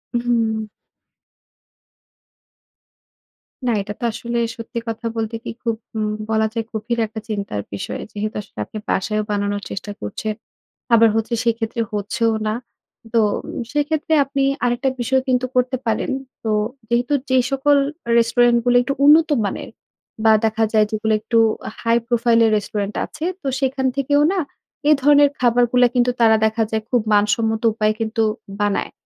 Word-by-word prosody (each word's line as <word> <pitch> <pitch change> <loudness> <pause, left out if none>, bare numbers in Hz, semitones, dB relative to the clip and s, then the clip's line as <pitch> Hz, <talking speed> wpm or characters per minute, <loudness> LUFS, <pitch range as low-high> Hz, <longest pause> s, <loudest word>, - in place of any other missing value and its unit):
উম-হুম। 230 -2 0 3.0
না - - +3
এটা 205 +1 -6
তো - - -9
আসলে 235 +2 -4 0.2
সত্যি 230 +1 -5
কথা 225 +1 -5
বলতে 225 0 -2
কি? - - -6
খুব 230 -2 0 0.2
হুম 215 -1 -1 0.2
বলা 220 0 +2
যায় 230 -2 -1
গভীর 230 +2 -3
একটা 220 +1 -7
চিন্তার 200 - -3
বিষয় 100 - -4
যেহেতু 210 +1 -4
আসলে - - -20
আপনি - - -9
বাসায়ও 215 +3 0
বানানোর 205 0 -1
চেষ্টা 205 +1 -5
করছেন। 215 - -3 0.6
আবার 230 0 +7
হচ্ছে 225 +2 -1
সে 235 - +3
ক্ষেত্রে 230 +1 -2
হচ্ছেও 225 +3 0
না। 215 - 0 0.6
তো 230 - +4 0.5
সে 295 - 0
ক্ষেত্রে 315 0 -1
আপনি 275 0 -1 0.2
আরেকটা 245 +2 +1
বিষয় 260 +2 +2
কিন্তু 255 -1 +2
করতে 250 +1 +1
পারেন 220 +4 0 0.3
তো 220 - -1 0.4
যেহেতু 245 +3 +1 0.2
যে 260 - +3
সকল 285 +1 +3 0.4
রেস্টুরেন্টগুলো 240 +1 +3
একটু 275 - -1
উন্নত 315 +3 +6 0.2
মানের 200 - -4 0.6
বা 220 - +7
দেখা 220 0 +1
যায় 215 -1 +5
যেগুলো 220 0 0
একটু 230 +1 0 0.5
high 230 0 +3
profile 235 -1 +3
এর 220 - +3
রেস্টুরেন্ট 205 0 -3
আছে 310 +1 -10 0.2
তো 280 - -5
সেখান 265 0 0
থেকেও 285 +2 +2
না 385 - 0 0.5
এ - - +7
ধরনের 290 +1 +6
খাবারগুলা 245 0 +4
কিন্তু 245 0 +3
তারা 220 -1 +6
দেখা 220 +1 +1
যায় 220 -1 -1
খুব 245 -2 +2
মানসম্মত 220 +2 +2
উপায়ে 215 -1 +1
কিন্তু 225 0 0 0.4
বানায়। 205 -1 0
230 Hz, 150 wpm, -20 LUFS, 215-245 Hz, 3.0 s, আবার